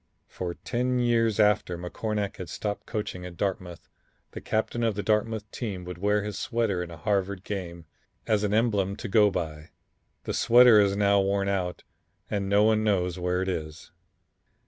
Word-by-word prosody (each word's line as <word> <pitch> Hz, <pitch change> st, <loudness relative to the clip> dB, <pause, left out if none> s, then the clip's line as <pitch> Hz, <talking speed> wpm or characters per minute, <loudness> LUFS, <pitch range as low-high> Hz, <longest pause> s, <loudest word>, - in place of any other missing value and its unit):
For 90 Hz, -2 st, -5 dB
ten 125 Hz, +1 st, -1 dB
years 115 Hz, -3 st, +2 dB
after 105 Hz, -4 st, +2 dB
McCornack 100 Hz, +4 st, -3 dB
had 90 Hz, -4 st, -7 dB
stopped 105 Hz, +4 st, -4 dB
coaching 105 Hz, -4 st, -4 dB
at 90 Hz, -1 st, -9 dB
Dartmouth, 90 Hz, -3 st, -4 dB, 0.4 s
the -, -, -8 dB
captain 110 Hz, +2 st, -1 dB
of 115 Hz, -3 st, +1 dB
the 105 Hz, -, -3 dB
Dartmouth 110 Hz, 0 st, 0 dB
team 100 Hz, -7 st, -5 dB
would 90 Hz, -1 st, -7 dB
wear 105 Hz, +1 st, +1 dB
his 105 Hz, -1 st, -5 dB
sweater 115 Hz, -8 st, -1 dB
in 90 Hz, -, -5 dB
a 85 Hz, -, -9 dB
Harvard 100 Hz, -2 st, -1 dB
game 85 Hz, -5 st, -6 dB, 0.4 s
as 105 Hz, -1 st, +1 dB
an 105 Hz, -, 0 dB
emblem 105 Hz, -3 st, +1 dB
to 120 Hz, -, -6 dB
go 105 Hz, 0 st, +5 dB
by. 80 Hz, -5 st, -5 dB, 0.5 s
The -, -, -3 dB
sweater 120 Hz, -2 st, +6 dB
is 100 Hz, -1 st, +3 dB
now 100 Hz, -1 st, +3 dB
worn 100 Hz, 0 st, 0 dB
out, 90 Hz, -3 st, -2 dB, 0.5 s
and 100 Hz, -2 st, -1 dB
no 100 Hz, +1 st, +4 dB
one 110 Hz, 0 st, +3 dB
knows 90 Hz, -4 st, 0 dB
where 90 Hz, +1 st, 0 dB
it -, -, -5 dB
is. 80 Hz, -4 st, -5 dB
100 Hz, 175 wpm, -27 LUFS, 90-110 Hz, 0.5 s, sweater